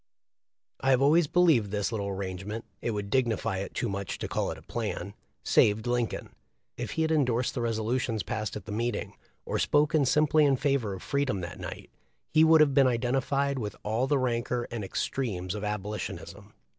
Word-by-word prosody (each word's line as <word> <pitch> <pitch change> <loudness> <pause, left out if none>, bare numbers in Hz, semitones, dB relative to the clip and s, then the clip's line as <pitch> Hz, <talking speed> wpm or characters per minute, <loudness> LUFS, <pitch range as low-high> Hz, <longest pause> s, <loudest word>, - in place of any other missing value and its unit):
* - - -65 0.3
I 135 - +1
have 130 -1 +4
always 155 +3 +5
believed 155 - +4
this 105 +2 -1
little 105 -3 -2
arrangement 100 +3 -4
— - - -43
it - - -2
would 105 -2 -3
dignify 115 -7 +1
it 100 - -6
too - - -1
much 100 -1 -4
to - - -4
call - - -1
it - - -5
a - - -14
plan 95 +3 -4 0.2
— - - -44
saved 105 +2 +3
Lincoln. 120 -2 -1 0.5
If - - -5
he 160 - +1
had 160 - 0
endorsed 125 -6 +1
the 125 - -2
resolutions 115 0 -1
passed 110 -2 -3
at 105 - -7
the 110 - -7
meeting, 120 +3 -2 0.3
or - - -1
spoken 150 0 +3
sim 150 +4 +4
ply 155 +1 +3
in 140 -3 +4
favor 135 -8 0
of 95 - -10
freedom 140 -9 0
that 85 -1 -7
night, - - -7 0.4
he 155 - +5
would 160 -1 +7
have 145 -2 +4
been 135 -1 +5
identified 135 +3 0
with 105 -3 -4
all 115 +5 0
the 145 0 +2
rancor 120 -1 -1
and 115 -3 -4
extremes 95 -3 -2
of 105 -1 -5
Abolitionism. 105 0 -5
120 Hz, 200 wpm, -28 LUFS, 105-140 Hz, 0.5 s, would